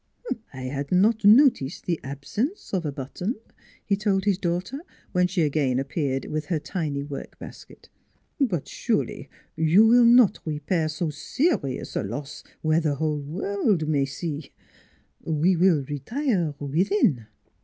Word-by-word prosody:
" 230 - -3
I 130 - -9
had 140 +2 -4
not 210 +5 +3
noticed 210 - +5
the 170 -3 -1
absence 205 - -4
of 175 -5 0
a - - -2
button," 145 - -4 0.5
he 200 - +2
told 195 -2 0
his 200 -2 +2
daughter, 180 +9 -2 0.3
when 180 -1 +2
she 180 -2 0
again 145 -4 +1
appeared, 135 0 -2
with 155 0 -4
her 170 - 0
tiny 150 -4 -3
work 145 -1 -8
basket. - - -12 0.3
" - - -45
But 170 -6 -2
surely - - -2 0.3
you 160 +5 +4
will 240 +2 +6
200 - - +6
NEIGHBORS 235 - +7
not 240 -6 +4
repair 155 +1 -1
so 155 +2 -2
serious 145 - -1
a - - +1
loss 120 +8 -6 0.2
where 155 +1 +3
the 150 -3 0
whole 150 0 -1
world 180 +3 -1
may 145 -3 +2
see: 145 +1 -5 0.7
we 165 +4 +2
will 170 -4 +3
retire 170 - -2
within." 155 - +1
160 Hz, 155 wpm, -25 LUFS, 145-195 Hz, 0.7 s, NEIGHBORS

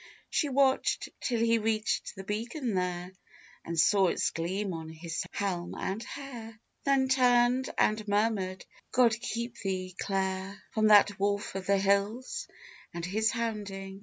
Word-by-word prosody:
She 295 - +1
watched 270 0 +2
till 240 -3 -1
he 230 0 +3
reached 220 -1 -1
the 195 - -7
beacon 230 +5 -3
there, 180 -1 -2 0.5
And 165 -1 -3
saw 195 +3 +5
its - - +1
gleam 185 +4 -2
on 160 -1 -6
his 165 +1 -4
helm 180 -3 -2
and 195 +3 -3
hair, 235 -5 -8 0.3
Then 275 -1 +3
turned 250 0 +4
and 215 0 +2
murmured, 205 -3 0 0.3
"God 240 -2 +5
keep 235 +1 -4
thee, 185 -2 -3
Clare! 190 0 -2
From 215 -4 +2
that 205 -1 +6
wolf 200 +1 0
of 190 -1 -5
the 200 0 +4
hills 200 +5 0 0.5
and 170 -1 -3
his 220 +4 +1
hounding." 200 -4 -4
205 Hz, 145 wpm, -30 LUFS, 190-230 Hz, 0.5 s, that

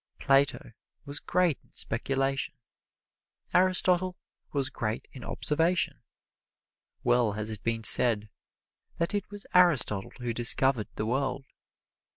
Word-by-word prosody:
Plato 135 -3 +1 0.3
was 145 0 -5
great 180 -5 0
in - - -29
speculation; 135 +3 -2 1.0
Aristotle 185 0 +2 0.3
was 135 -2 -1
great 110 -3 -4
in 130 - -11
observation. 165 +4 -1 1.0
Well 120 -3 +2
has 110 +1 -4
it 105 -3 -6
been 115 -1 -2
said 110 0 +5 0.7
that 170 +3 -2
it 205 -2 -3
was 205 0 -10
Aristotle 150 - +3
who 120 -2 -4
discovered 120 0 +3
the 105 - -3
world. 135 +3 -2
135 Hz, 115 wpm, -28 LUFS, 115-170 Hz, 1.0 s, said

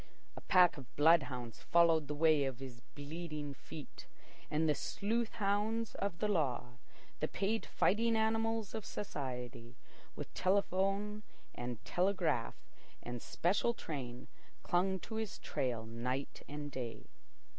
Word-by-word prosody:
A - - -8
pack 180 -4 +5
of 135 -3 -11
bloodhounds 135 -7 +3
followed 165 -3 +4
the 150 - -2
way 155 -2 +5
of 135 -2 -2
his 130 -3 -8
bleeding 150 0 -5
feet. 150 +1 -10 0.4
And 155 +1 +2
the 150 - +5
sleuth 225 +9 -1
hounds 210 +2 +1
of 200 -4 -2
the 210 - +1
law, 125 -10 0 0.4
the - - +1
paid 210 +3 -1
fighting 230 +3 +3
animals 225 -1 +1
of 220 - -3
society, 125 - -5 0.4
with - - -7
telephone, 200 +2 +1 0.3
and 120 -3 -5
telegraph, 180 -10 +1 0.5
and 120 -1 -5
special 200 +7 +1
train, 130 - -5 0.4
clung 190 +2 +2
to 220 - -5
his 220 -2 -3
trail 120 -4 -2
night 125 +4 -3
and 145 0 -5
day. 125 -3 -5
160 Hz, 130 wpm, -36 LUFS, 130-200 Hz, 0.5 s, pack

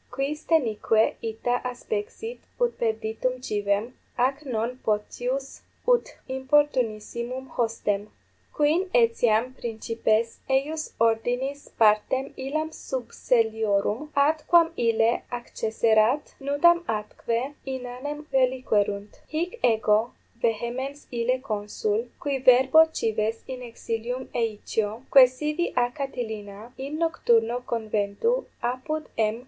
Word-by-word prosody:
quis 290 +3 -2
denique 225 -7 +3 0.2
ita 245 +2 -1 0.2
aspexit 445 - -5 0.2
ut 480 -1 +2
perditum 225 +3 -1
civem, 205 +2 -1 0.2
ac 265 +4 +1
non 245 0 -2
potius 245 +5 -2 0.3
ut - - +2
importunissimum 260 -2 0
hostem? 215 -3 -1 0.4
quin 320 +6 +2
etiam 230 0 +3
principes 230 -1 -1
eius 295 +4 0
ordinis 245 +5 0
partem 220 +5 +3
illam 310 +4 -2
subselliorum, 225 -1 0
ad 300 +2 +3
quam 340 -1 +5
ille 230 -2 +2
accesserat, 230 +2 +1
nudam 340 +5 +4
atque 230 +4 -2
inanem 265 +3 -5
reliquerunt. 220 -6 +1
Hic 345 +9 -3
ego 220 0 +3 0.3
vehemens 240 +5 -2
ille 240 +1 +1
consul, 210 0 -2
qui 280 -2 -1
verbo 260 +5 +7
cives 220 -3 -1
in 255 -1 -6
exilium 240 +1 -4
eicio, 220 0 -2
quaesivi 300 +6 +4
a 245 -1 +2
Catilina, 225 -6 -6
in 280 +3 -4
nocturno 245 -8 +2
conventu 220 - 0 0.2
apud 280 +6 -2
M. 220 +1 +1
245 Hz, 100 wpm, -26 LUFS, 220-275 Hz, 0.4 s, verbo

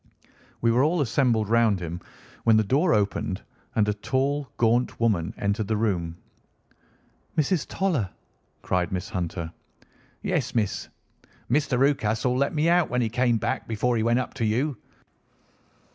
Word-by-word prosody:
We 115 - +3
were 125 +3 +3
all 165 +4 +2
assembled 115 -4 +2
round 115 -3 +3
him 85 0 -5 0.4
when 115 -1 +5
the 110 - +4
door 145 - +2
opened, 100 -3 0 0.3
and 105 -2 +3
a 105 - +2
tall, 135 +6 -1
gaunt 120 +2 +2
woman 105 -8 +1
entered 100 +1 -1
the 110 0 0
room. 85 -6 -1 1.2
"Mrs. 155 +1 +1
Toller!" 160 - 0 0.5
cried 90 -1 0
Miss 90 0 -3
Hunter. 85 -3 -3 0.7
"Yes, - - -1
miss. 105 -4 -1 0.6
Mr. 140 -1 +2
Rucastle 125 -3 +2
let 140 +2 +1
me 155 +2 +2
out 175 0 +3
when 125 - 0
he 115 - 0
came 120 0 +2
back - - -2
before 115 +2 0
he 110 - +1
went 115 +2 +2
up 130 - -2
to 130 - -3
you. 130 +7 0
115 Hz, 150 wpm, -26 LUFS, 105-135 Hz, 1.2 s, when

